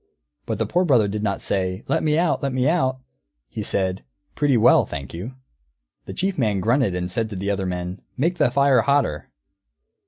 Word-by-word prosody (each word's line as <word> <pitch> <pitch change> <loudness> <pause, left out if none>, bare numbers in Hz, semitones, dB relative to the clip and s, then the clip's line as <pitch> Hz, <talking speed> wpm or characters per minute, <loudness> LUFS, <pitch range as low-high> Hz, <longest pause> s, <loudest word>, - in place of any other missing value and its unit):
But - - -2
the - - 0
Poor 180 - +1
Brother 125 - +3
did 105 +1 -3
not 100 -2 -2
say, 95 0 -1
"Let - - +1
me 155 -1 +1
out! 170 -2 +1
Let 140 -1 -2
me 130 +1 +1
out!" 130 -6 +1 0.5
He - - -6
said, 95 -4 -1 0.3
"Pretty 145 -4 +2
well, 110 - +5
thank 70 -2 -7
you." 100 +10 -7 0.7
The - - -6
Chief 190 -3 -1
Man 105 -5 +1
grunted 115 -1 +1
and 90 0 -3
said 115 +2 -1
to 105 - -7
the 100 +2 -2
other 95 -2 -2
men, 90 +1 -4 0.2
"Make 170 +6 0
the - - +4
fire 140 -1 +4
hotter." 140 - 0
115 Hz, 195 wpm, -22 LUFS, 95-140 Hz, 0.7 s, well